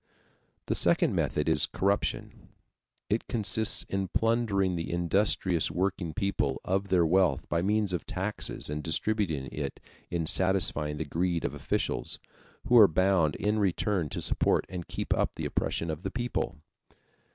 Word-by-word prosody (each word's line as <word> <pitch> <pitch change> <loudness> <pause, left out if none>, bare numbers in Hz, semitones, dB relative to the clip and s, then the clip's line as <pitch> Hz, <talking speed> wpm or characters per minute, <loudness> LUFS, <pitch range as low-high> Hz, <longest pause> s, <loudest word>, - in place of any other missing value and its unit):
The - - -1
second - - +3
method 75 - -1
is 80 -3 +2
corruption. 100 +1 -2 0.6
It 105 +4 -1
consists 110 -2 +1
in 95 -1 -3
plundering 105 -3 +1
the 85 -1 -4
industrious 85 0 +2
working 90 -3 -2
people 85 -9 -1
of 95 +2 0
their 90 -3 +3
wealth 85 -5 +2
by 85 - 0
means 105 0 0
of 85 - -3
taxes 95 +3 -2
and 75 +1 -3
distributing 80 -4 0
it 70 -2 -5 0.3
in 85 -2 -2
satisfying 80 -5 +2
the 80 - -3
greed 85 +3 -1
of - - -2
officials, - - -3 0.5
who 120 -1 +6
are 105 - +9
bound 90 -3 +2
in 105 +2 0
return 95 -3 0
to - - -4
support - - +1
and 90 -2 -6
keep - - -2
up - - -1
the - - -5
oppression 85 -1 -2
of 80 +1 -6
the 95 - -3
people. 120 +3 -3
95 Hz, 150 wpm, -28 LUFS, 80-100 Hz, 0.6 s, are